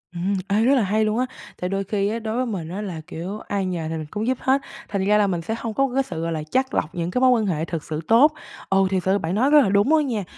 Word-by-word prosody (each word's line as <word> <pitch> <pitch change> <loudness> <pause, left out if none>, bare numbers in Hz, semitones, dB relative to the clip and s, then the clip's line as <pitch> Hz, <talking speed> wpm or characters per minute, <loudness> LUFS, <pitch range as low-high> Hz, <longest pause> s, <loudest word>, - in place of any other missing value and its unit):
Ừm, 180 +4 -1
ê, 205 +2 +2
rất 265 +4 +4
là 250 - +3
hay 215 +3 +1
luôn 215 +2 0
á! 255 - +2 0.3
Thì 180 - -3
đôi 195 +1 -1
khi 200 0 -1
á, 225 +2 -2
đối 220 0 -4
với 255 - +1
mình 190 -9 -4
á, 190 +4 -4
là, 180 -6 -5
kiểu, 185 +6 -6
ai 200 -3 -2
nhờ 170 -4 -3
thì 160 - -3
mình 155 - -5
cũng 215 +2 -3
giúp 260 0 +1
hết, 270 +1 +2 0.3
thành 195 -2 -1
ra 210 +1 +4
là 210 -1 +3
mình 175 -3 -1
sẽ 220 +7 -3
hông 230 -1 -4
có 275 +3 +1
cái 270 +1 +2
sự, 165 -10 -6
gọi 165 0 -2
là, 155 -2 -3
chắt 260 0 +1
lọc 160 +2 -1
những 170 0 -2
cái 250 - 0
mối 260 - +6
quan 230 -3 +2
hệ 165 -5 -1
thực 165 -3 -4
sự 155 0 -4
tốt. 265 +7 +6 0.4
Ừ, 195 0 +3
thực 185 -2 0
sự 190 +2 +2
bạn 170 -1 -2
nói 255 +7 +3
rất 300 0 +7
là 240 - +2
đúng 200 +5 +3
đó 315 - +5
nha. 240 -8 -1
205 Hz, 320 wpm, -23 LUFS, 180-230 Hz, 0.4 s, rất